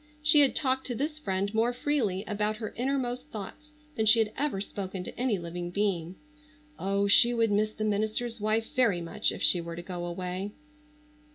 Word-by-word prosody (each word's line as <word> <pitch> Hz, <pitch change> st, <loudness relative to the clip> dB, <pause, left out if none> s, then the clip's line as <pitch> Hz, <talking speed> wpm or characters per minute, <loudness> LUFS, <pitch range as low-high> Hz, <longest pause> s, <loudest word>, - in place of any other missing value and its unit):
She 300 Hz, 0 st, +6 dB
had 280 Hz, -2 st, +5 dB
talked 265 Hz, -2 st, +2 dB
to 245 Hz, -, -3 dB
this 300 Hz, +5 st, -3 dB
friend 195 Hz, -5 st, -2 dB
more 230 Hz, +2 st, +2 dB
freely 240 Hz, -9 st, -1 dB
about 210 Hz, +1 st, -1 dB
her 220 Hz, -1 st, -6 dB
innermost 255 Hz, 0 st, -2 dB
thoughts 230 Hz, +8 st, -8 dB, 0.2 s
than 220 Hz, -1 st, 0 dB
she 220 Hz, +2 st, +7 dB
had 220 Hz, -1 st, +1 dB
ever 280 Hz, -9 st, -1 dB
spoken 195 Hz, -2 st, -5 dB
to -, -, -8 dB
any 245 Hz, -3 st, 0 dB
living 175 Hz, 0 st, -5 dB
being. 180 Hz, -3 st, -1 dB, 0.6 s
Oh, 200 Hz, +1 st, +1 dB
she 235 Hz, +4 st, +6 dB
would 225 Hz, -2 st, +2 dB
miss 215 Hz, +1 st, +2 dB
the 215 Hz, -, -4 dB
minister's 215 Hz, +3 st, -1 dB
wife 215 Hz, +1 st, +1 dB
very 230 Hz, -9 st, +3 dB
much 185 Hz, +6 st, 0 dB
if -, -, -6 dB
she 175 Hz, -, +5 dB
were 170 Hz, 0 st, -6 dB
to 175 Hz, -, -7 dB
go 175 Hz, -1 st, -5 dB
away. 180 Hz, +3 st, -4 dB
215 Hz, 190 wpm, -29 LUFS, 190-245 Hz, 0.6 s, she